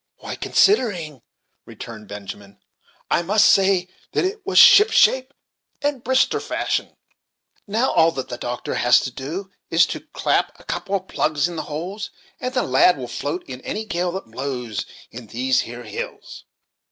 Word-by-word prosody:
"Why, - - -7
considering," 180 - +1 0.5
returned 110 -2 -10
Benjamin, 100 0 -9 0.5
"I - - +3
must 205 +5 +3
say 190 -2 +4 0.3
that - - +1
it 405 +2 -3
was 390 - 0
ship 420 +2 +9
shape 260 -10 +3 0.5
and 285 -4 -2
Brister 260 +2 +2
fashion. - - -2 0.7
Now 225 +6 +1
all 165 0 +4
that 130 -1 -4
the 120 - -6
doctor 120 0 -4
has 125 - +4
to 130 - -4
do, 165 +10 -6 0.2
is 165 +1 +5
to - - -5
clap - - 0
a - - -16
couple 200 - -3
of 190 -1 -3
plugs 155 +1 0
in 175 - -7
the 160 - -2
holes, 180 +8 -5 0.3
and 255 - -3
the 255 -1 0
lad 135 +6 +4
will 125 -2 -6
float 145 +8 -4
in 130 -1 -8
any 220 - -4
gale 175 -3 -1
that 190 - -5
blows 125 -2 -5 0.2
in 115 -1 -10
these 125 +4 +1
here 120 +1 -5
hills." 105 -2 -7
165 Hz, 165 wpm, -22 LUFS, -, 0.7 s, ship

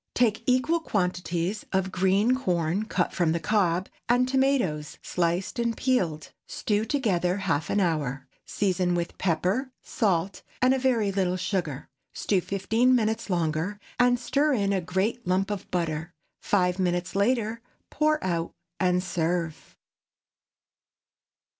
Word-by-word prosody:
Take 220 -3 +2
equal 255 +7 +3
quantities 180 - -1
of 190 0 0
green 195 +6 +3
corn 180 -4 0
cut - - -1
from 170 -3 +1
the 170 - 0
cob, 180 0 +1 0.2
and 245 +1 +4
tomatoes 255 - +1
sliced 175 +5 -1
and 235 -1 0
peeled. 180 - 0 0.2
Stew 210 0 -1
together 195 - 0
half 165 -7 -1
an 205 - +1
hour; 145 -7 -1 0.2
season 185 -3 0
with 170 0 -3
pepper, 190 - 0
salt, 190 -4 0 0.2
and 255 +1 +4
a 265 - +1
very 235 -6 +2
little 185 -2 0
sugar. 165 -8 -2 0.3
Stew 195 -3 0
fifteen 225 +7 +2
minutes 225 -1 0
longer, 170 +3 -1 0.2
and 245 0 +5
stir 285 +4 +1
in 200 -5 +1
a 190 - +1
great 190 +6 -1
lump 190 +3 +1
of 205 -3 -5
butter. 165 -1 -2 0.3
Five 180 -2 +1
minutes 175 0 -1
later, 225 +2 +1 0.3
pour 305 +1 +2
out 170 -2 -2 0.2
and 180 0 +2
serve. 170 -2 -2
190 Hz, 135 wpm, -26 LUFS, 175-230 Hz, 0.3 s, and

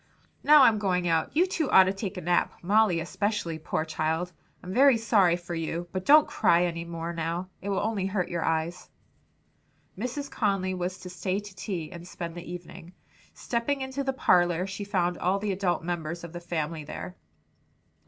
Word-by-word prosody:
Now 300 -1 +8
I'm 220 -4 +5
going 180 -3 0
out. 165 -1 +1
You 350 - +6
two 325 -6 -1
ought 190 - +8
to 190 +1 0
take 195 0 -5
a - - -4
nap; 175 +1 +1
Molly 200 -2 +3
especially, 195 -2 -2
poor 155 0 -2
child! 160 +3 -2 0.3
I'm 180 +1 -6
very 265 +1 +6
sorry 205 -6 +3
for 175 0 -7
you; 165 +1 -3
but 185 -1 -4
don't 300 +1 +7
cry 170 +1 +3
any 170 -1 -2
more 170 0 -5
now. 170 +3 -3
It 200 - -4
will 195 -1 0
only 205 -3 -1
hurt 190 -2 -1
your 170 -1 -2
eyes." 165 +2 -2 1.1
Mrs. 255 +7 -4
Conly 195 -4 0
was 180 0 -3
to 180 - -8
stay 185 +2 -2
to 205 -1 -11
tea 180 -5 -5
and 170 0 -9
spend 170 -2 -6
the 175 0 -8
evening. 175 0 -9 0.4
Stepping 255 +4 -2
into 265 +1 -3
the 270 - 0
parlor 175 -7 +3
she 195 +1 -5
found 180 -3 0
all 185 +2 +1
the 205 0 -2
adult 185 -3 -1
members 170 -1 -4
of 170 -1 -8
the 175 - -5
family 165 -2 -3
there. 180 +4 -7
180 Hz, 190 wpm, -27 LUFS, 170-205 Hz, 1.1 s, Now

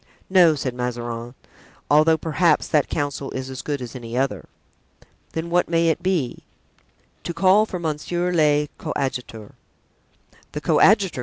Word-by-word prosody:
"No," 175 -4 +6
said 130 -3 -3
Mazarin; 120 -1 -5 0.5
"although, 155 +3 +4
perhaps, 160 +1 +1
that 150 -3 +1
counsel 140 -2 -3
is 130 0 -5
as 130 0 -6
good 140 -2 -3
as 120 - -9
any 120 -1 -6
other." 130 - -1 0.9
"Then 165 +1 -4
what 175 -1 +2
may 165 -1 +2
it 160 - 0
be?" 170 -10 -1 0.8
"To 170 - -5
call 195 +4 +4
for 185 - -4
monsieur 175 +2 -2
le 150 -3 +3
coadjuteur." 125 -7 -4 1.0
"The - - -4
coadjutor!" 195 - +3
150 Hz, 140 wpm, -22 LUFS, 130-170 Hz, 1.0 s, No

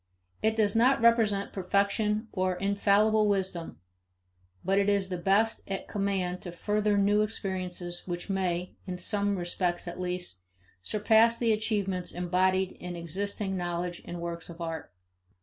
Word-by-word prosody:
It 220 0 +2
does 210 -2 +2
not 250 +4 +4
represent 225 -4 +3
perfection 200 +3 +1
or 185 -2 0
infallible 200 +2 +3
wisdom; 190 - -1 0.9
but 195 +2 +3
it 200 0 +2
is 200 -2 +1
the 180 - -2
best 200 +5 +2
at 195 -1 -3
command 195 -3 -1
to 175 - -6
further 210 +3 +1
new 205 +1 +4
experiences 185 -4 -3
which 175 -1 -4
may, 180 -2 -1
in 180 -1 -3
some 200 +2 0
respects 175 0 -2
at 175 +1 -6
least, 180 - -4 0.4
surpass 220 - +4
the 230 -2 +2
achievements 200 -4 -1
embodied 185 +1 +1
in 180 0 -6
existing 195 +4 -3
knowledge 175 -1 -3
and 175 - -6
works 170 0 -5
of 170 0 -10
art. 165 -1 -5
195 Hz, 145 wpm, -29 LUFS, 180-210 Hz, 0.9 s, not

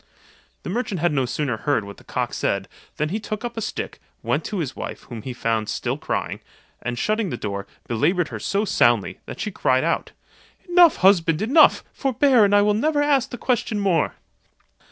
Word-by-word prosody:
The - - -5
merchant 210 -4 -2
had 175 +2 +2
no 135 -3 +1
sooner 130 -3 -2
heard 140 -1 0
what 100 0 -10
the - - -16
cock - - -3
said, - - -1 0.3
than 150 0 0
he 210 +6 -2
took 215 +1 -5
up 240 - -5
a 225 - -3
stick, 215 - -5 0.2
went - - 0
to 210 - -3
his 150 -7 -3
wife, - - -6
whom 120 -3 -8
he 130 - -6
found 115 -3 -1
still - - -2
crying, - - -3 0.4
and 120 0 -3
shutting 215 - 0
the 125 - -4
door, 100 -2 -4 0.2
belaboured 155 - +1
her - - -6
so 200 +2 0
soundly, 120 - +2
that - - -8
she 210 - -3
cried 130 -7 +1
out, 170 - -1 0.6
"Enough, 350 -2 +6
husband, 170 -5 +4
enough, 275 +9 +5
forbear, 265 -2 +3
and 200 0 +3
I 205 - +5
will 210 0 +3
never 290 +7 +1
ask 275 -3 +2
the 245 - -6
question 235 -4 -1
more." 185 -6 +1
190 Hz, 195 wpm, -23 LUFS, -, 0.6 s, Enough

